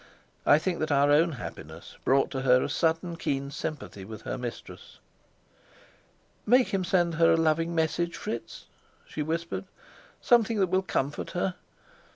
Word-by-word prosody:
I 145 Hz, -, +7 dB
think 170 Hz, +2 st, -2 dB
that 155 Hz, 0 st, -1 dB
our 145 Hz, 0 st, +4 dB
own 160 Hz, +3 st, +4 dB
happiness 130 Hz, -, -9 dB
brought 135 Hz, +1 st, +2 dB
to 130 Hz, -, -3 dB
her 125 Hz, -1 st, +4 dB
a -, -, -2 dB
sudden 165 Hz, +1 st, 0 dB
keen 140 Hz, -3 st, -2 dB
sympathy 145 Hz, -9 st, -6 dB
with 110 Hz, +2 st, -9 dB
her -, -, -3 dB
mistress. 125 Hz, -2 st, -8 dB, 1.5 s
"Make 250 Hz, +3 st, +4 dB
him 195 Hz, -1 st, 0 dB
send 175 Hz, -2 st, +1 dB
her 165 Hz, 0 st, +6 dB
a -, -, +3 dB
loving 165 Hz, +1 st, +1 dB
message, 165 Hz, +1 st, 0 dB
Fritz," 115 Hz, -, -6 dB, 0.4 s
she 155 Hz, -, -5 dB
whispered. 165 Hz, +4 st, -3 dB, 0.5 s
"Something 230 Hz, -3 st, +3 dB
that 190 Hz, -2 st, +2 dB
will 190 Hz, 0 st, +3 dB
comfort 145 Hz, -6 st, -2 dB
her. 185 Hz, +1 st, 0 dB
160 Hz, 155 wpm, -28 LUFS, 140-175 Hz, 1.5 s, I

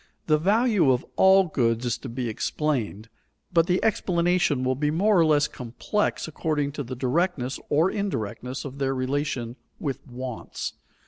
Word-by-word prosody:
The 155 Hz, -1 st, +3 dB
value 205 Hz, -, +3 dB
of 125 Hz, -, 0 dB
all 190 Hz, 0 st, +6 dB
goods 120 Hz, -8 st, 0 dB
is 120 Hz, -1 st, -1 dB
to 130 Hz, -, -7 dB
be 120 Hz, +1 st, -3 dB
explained, 115 Hz, -2 st, -2 dB, 0.5 s
but 165 Hz, -1 st, +4 dB
the 180 Hz, +1 st, +2 dB
explanation 175 Hz, -8 st, +1 dB
will 130 Hz, 0 st, +2 dB
be 150 Hz, +3 st, 0 dB
more 200 Hz, +7 st, +3 dB
or 165 Hz, -, +5 dB
less 150 Hz, -1 st, +4 dB
complex 130 Hz, -, -2 dB
according 150 Hz, -2 st, -1 dB
to 145 Hz, 0 st, -4 dB
the 130 Hz, +1 st, -6 dB
directness 135 Hz, 0 st, 0 dB
or 160 Hz, +6 st, +3 dB
indirectness 130 Hz, -, -3 dB
of 140 Hz, 0 st, -7 dB
their 135 Hz, -1 st, 0 dB
relation 130 Hz, -2 st, -2 dB, 0.2 s
with 140 Hz, -4 st, -3 dB
wants. 125 Hz, -1 st, -6 dB
145 Hz, 155 wpm, -25 LUFS, 125-170 Hz, 0.5 s, all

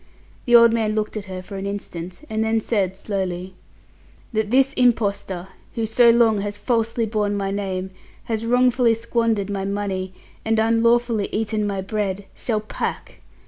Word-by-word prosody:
The 240 Hz, -, +5 dB
old 235 Hz, -1 st, +8 dB
man 220 Hz, -2 st, 0 dB
looked 215 Hz, 0 st, -2 dB
at 210 Hz, -2 st, -4 dB
her 185 Hz, -1 st, -7 dB
for 195 Hz, +1 st, -8 dB
an 195 Hz, +1 st, -4 dB
instant, 185 Hz, -, -6 dB
and 220 Hz, 0 st, -1 dB
then 220 Hz, 0 st, +1 dB
said 195 Hz, -4 st, -1 dB
slowly, 190 Hz, -2 st, -3 dB, 0.8 s
"That 220 Hz, -1 st, 0 dB
this 270 Hz, +3 st, +3 dB
impostor, 200 Hz, -7 st, 0 dB, 0.3 s
who 230 Hz, -, 0 dB
so 235 Hz, +2 st, +5 dB
long 230 Hz, -3 st, +4 dB
has 205 Hz, 0 st, -4 dB
falsely 230 Hz, 0 st, 0 dB
borne 210 Hz, -2 st, -1 dB
my 195 Hz, -1 st, -2 dB
name, 190 Hz, -2 st, -3 dB, 0.3 s
has 225 Hz, -1 st, -3 dB
wrongfully 245 Hz, 0 st, +3 dB
squandered 230 Hz, -3 st, 0 dB
my 195 Hz, -1 st, -2 dB
money, 195 Hz, -2 st, -3 dB, 0.3 s
and 225 Hz, 0 st, +1 dB
unlawfully 230 Hz, 0 st, +2 dB
eaten 215 Hz, -1 st, -1 dB
my 195 Hz, -1 st, -2 dB
bread, 200 Hz, -1 st, -3 dB
shall 220 Hz, -3 st, -2 dB
pack! 215 Hz, -, -5 dB
215 Hz, 160 wpm, -22 LUFS, 195-230 Hz, 0.8 s, old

